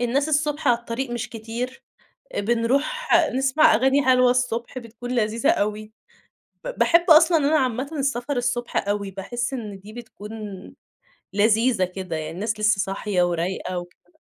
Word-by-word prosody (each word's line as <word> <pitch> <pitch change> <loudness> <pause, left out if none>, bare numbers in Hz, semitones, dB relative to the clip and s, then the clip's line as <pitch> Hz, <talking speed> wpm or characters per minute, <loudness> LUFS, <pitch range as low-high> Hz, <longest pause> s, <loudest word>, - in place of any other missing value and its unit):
الناس 265 +5 0
الصبح 295 -1 0
على 240 -1 +4
الطريق 240 +2 -5
مش 240 -1 -4
كتير، 230 +3 -6 0.5
أ - - 0
بنروح 255 - 0 0.3
نسمع 270 +3 +4
أغاني 265 +5 +3
حلوة 255 -1 +5
الصبح 250 0 -1
بتكون 240 0 -9
لذيذة 230 -1 +1
أوي. 215 +1 -2 0.7
ب - - -6
باحب 340 +1 +4
أصلًا 325 +2 +7
أنا 305 +1 +2
عامةً 255 +1 -1
السفر 270 0 -1
الصبح 240 -3 -1
أوي، 200 -1 -2
باحس 240 +7 -4
إن 210 -6 -6
دي 205 +3 -13
بتكون 220 -3 -10 1.0
لذيذة 220 0 +3
كده، 185 -2 -5
يعني 155 0 -4
الناس 210 +6 -3
لسه 215 -2 +3
صاحية 195 -1 -1
ورايقة 175 +1 -2
وكده. 175 - -12
235 Hz, 145 wpm, -23 LUFS, 210-260 Hz, 1.0 s, أصلًا